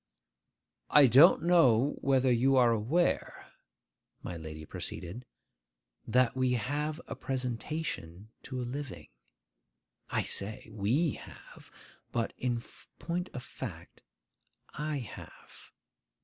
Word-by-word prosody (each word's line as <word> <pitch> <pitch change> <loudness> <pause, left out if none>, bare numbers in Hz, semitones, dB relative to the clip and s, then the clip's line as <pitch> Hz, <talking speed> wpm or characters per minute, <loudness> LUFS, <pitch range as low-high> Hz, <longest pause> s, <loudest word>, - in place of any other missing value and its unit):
'I 145 -1 +8
don't 135 +8 +7
know 145 -7 +4
whether 130 -1 +3
you 130 +3 +3
are 125 -2 +5
aware,' 120 +11 0 0.8
my 90 - -5
lady 80 -1 -8
proceeded, 95 +10 -7 0.8
'that 125 +1 +3
we 130 -1 +2
have 145 +6 -2
a - - -6
presentation 125 - -4
to 130 -1 -6
a - - -2
living? 135 +2 -6 1.0
I - - 0
say 105 +3 -1
we 115 - 0
have; - - -14 0.4
but, 115 -1 -1
in 120 -2 -1 0.3
point 180 +2 -3
of 125 - -5
fact, 90 -12 -9 0.7
I 150 0 -2
have. 125 -5 -11
125 Hz, 105 wpm, -31 LUFS, 115-145 Hz, 1.0 s, I